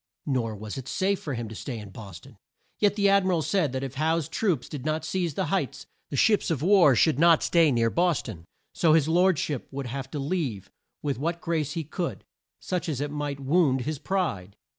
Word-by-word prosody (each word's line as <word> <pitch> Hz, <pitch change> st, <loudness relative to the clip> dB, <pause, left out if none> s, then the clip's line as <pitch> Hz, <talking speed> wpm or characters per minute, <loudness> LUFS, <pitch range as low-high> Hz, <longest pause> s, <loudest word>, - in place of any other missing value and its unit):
Nor 120 Hz, -6 st, -1 dB
was 105 Hz, +4 st, -6 dB
it 130 Hz, -, -9 dB
safe 195 Hz, 0 st, 0 dB
for 145 Hz, -4 st, -4 dB
him 115 Hz, -1 st, -4 dB
to 110 Hz, -, -8 dB
stay 120 Hz, +3 st, -6 dB
in 105 Hz, -3 st, -9 dB
Bos 95 Hz, -4 st, -10 dB
ton. 125 Hz, -3 st, -17 dB, 0.4 s
Yet 205 Hz, -1 st, +3 dB
the 200 Hz, -1 st, +3 dB
Ad 200 Hz, 0 st, +4 dB
mi 185 Hz, -, 0 dB
ral 170 Hz, -4 st, +1 dB
said 175 Hz, -7 st, +1 dB
that 130 Hz, +1 st, -3 dB
if 135 Hz, -, -5 dB
Howe's 160 Hz, +1 st, 0 dB
troops 180 Hz, -, -1 dB
did 145 Hz, -4 st, -7 dB
not 155 Hz, +1 st, -1 dB
seize 175 Hz, -6 st, -2 dB
the 190 Hz, -, 0 dB
Heights, 140 Hz, -7 st, -2 dB, 0.2 s
the -, -, -4 dB
ships 210 Hz, -, +3 dB
of 155 Hz, -4 st, -1 dB
war 175 Hz, -7 st, +6 dB
should 145 Hz, +4 st, +3 dB
not 165 Hz, -1 st, +5 dB
stay 165 Hz, -3 st, +4 dB
near 115 Hz, -2 st, +2 dB
Bos 175 Hz, -4 st, +1 dB
ton; 85 Hz, -8 st, -9 dB, 0.3 s
so 160 Hz, -3 st, +3 dB
his 155 Hz, -2 st, +4 dB
lord 180 Hz, +1 st, +3 dB
ship 145 Hz, -3 st, -3 dB
would 140 Hz, 0 st, -5 dB
have 130 Hz, +2 st, -5 dB
to 150 Hz, -, -5 dB
leave 140 Hz, -, -3 dB, 0.3 s
with 140 Hz, -3 st, -2 dB
what 170 Hz, +4 st, -2 dB
grace 155 Hz, -4 st, -2 dB
he 165 Hz, -, -3 dB
could, 170 Hz, +4 st, -4 dB, 0.5 s
much 180 Hz, -1 st, -1 dB
as 140 Hz, -5 st, -2 dB
it 145 Hz, 0 st, -3 dB
might 145 Hz, -1 st, -3 dB
wound 140 Hz, -2 st, +2 dB
his 150 Hz, +2 st, -3 dB
pride. 105 Hz, -, -2 dB
150 Hz, 225 wpm, -26 LUFS, 130-170 Hz, 0.5 s, war